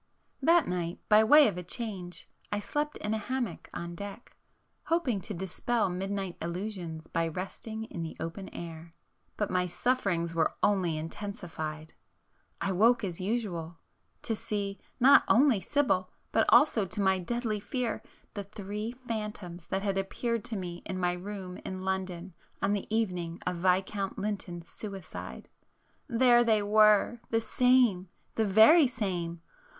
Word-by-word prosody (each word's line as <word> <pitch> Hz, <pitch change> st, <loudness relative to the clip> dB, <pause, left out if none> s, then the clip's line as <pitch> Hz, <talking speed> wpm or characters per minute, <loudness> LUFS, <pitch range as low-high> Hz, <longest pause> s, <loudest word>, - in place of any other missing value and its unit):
That 335 Hz, +2 st, +5 dB
night 175 Hz, -1 st, -2 dB
by 215 Hz, 0 st, +7 dB
way 295 Hz, +5 st, +8 dB
of 185 Hz, -4 st, -2 dB
a -, -, -6 dB
change, 185 Hz, -2 st, -4 dB, 0.2 s
I 205 Hz, -, 0 dB
slept 295 Hz, +8 st, -2 dB
in 210 Hz, +1 st, -2 dB
a 220 Hz, -, 0 dB
hammock 240 Hz, -4 st, -3 dB
on 170 Hz, 0 st, -6 dB
[p -, -, -13 dB
455] 200 Hz, +4 st, -7 dB
deck, -, -, -25 dB, 0.5 s
hoping 280 Hz, -, +1 dB
to 210 Hz, -, -6 dB
dispel 190 Hz, +5 st, 0 dB
midnight 195 Hz, 0 st, -3 dB
illusions 170 Hz, -2 st, -4 dB
by 165 Hz, 0 st, -1 dB
resting 195 Hz, +6 st, -5 dB
in 180 Hz, -6 st, -7 dB
the 160 Hz, -1 st, -5 dB
open 190 Hz, +4 st, -5 dB
air. 165 Hz, 0 st, -9 dB, 0.4 s
But 210 Hz, -, -1 dB
my 180 Hz, 0 st, +1 dB
sufferings 175 Hz, -5 st, 0 dB
were 165 Hz, -1 st, +1 dB
only 185 Hz, -6 st, +2 dB
intensified. 160 Hz, -3 st, -6 dB, 0.7 s
I 195 Hz, -, -1 dB
woke 230 Hz, +5 st, +4 dB
as 180 Hz, -3 st, -3 dB
usual,... 185 Hz, -6 st, -2 dB, 0.5 s
to 225 Hz, -, -1 dB
see, 200 Hz, -2 st, -3 dB, 0.2 s
not 270 Hz, +3 st, +7 dB
only 245 Hz, -4 st, +5 dB
Sibyl, 185 Hz, -5 st, +1 dB, 0.2 s
but -, -, +3 dB
also 230 Hz, -10 st, +5 dB
to 180 Hz, +3 st, -3 dB
my 190 Hz, -1 st, +3 dB
deadly 225 Hz, +2 st, -2 dB
fear, 245 Hz, +2 st, -2 dB, 0.3 s
the 205 Hz, -2 st, -5 dB
Three 210 Hz, +3 st, -5 dB
Phantoms 210 Hz, -6 st, -5 dB
that 195 Hz, +1 st, -2 dB
had 195 Hz, -1 st, 0 dB
appeared 230 Hz, +4 st, -2 dB
to 235 Hz, -2 st, -2 dB
me 175 Hz, -3 st, -5 dB
in 185 Hz, -, -4 dB
my 180 Hz, -1 st, +1 dB
room 185 Hz, 0 st, -6 dB
in 185 Hz, 0 st, -6 dB
London 190 Hz, -1 st, -3 dB, 0.3 s
on 200 Hz, -, +1 dB
the 205 Hz, -, -2 dB
evening 180 Hz, -6 st, -1 dB
of 180 Hz, -1 st, -1 dB
Viscount 190 Hz, +2 st, 0 dB
Lynton's 190 Hz, -4 st, -4 dB
suicide. 195 Hz, -5 st, -8 dB, 0.6 s
There 240 Hz, 0 st, +5 dB
they 220 Hz, -3 st, +3 dB
were,—the 215 Hz, +2 st, +4 dB
same, 245 Hz, -7 st, +3 dB, 0.2 s
the 220 Hz, -, +1 dB
very 240 Hz, -, +7 dB
same! 175 Hz, -8 st, -3 dB
195 Hz, 150 wpm, -30 LUFS, 180-220 Hz, 0.7 s, way